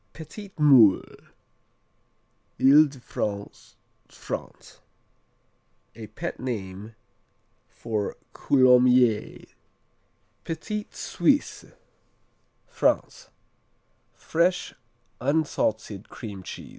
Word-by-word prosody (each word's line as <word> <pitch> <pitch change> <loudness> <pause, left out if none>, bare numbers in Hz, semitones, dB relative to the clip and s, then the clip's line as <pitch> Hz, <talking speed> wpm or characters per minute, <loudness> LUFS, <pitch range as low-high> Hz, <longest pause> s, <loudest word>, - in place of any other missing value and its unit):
Petit 195 +5 -10
Moule 130 - +4 1.3
Ile 145 +4 +6
de 140 -2 -13
France, 100 -4 -6 0.3
France - - -8 1.2
A 110 -2 -9
pet 110 - -6
name 105 -3 -6 0.7
for 110 -3 -4 0.2
Coulommiers. 125 -4 +3 1.0
Petit 210 +6 -5
Suisse - - -1 1.0
France - - -1 0.9
Fresh, 175 +2 0 0.5
unsalted 115 -8 -1
cream 100 -4 -8
cheese. - - -9
125 Hz, 65 wpm, -25 LUFS, 105-150 Hz, 1.3 s, Ile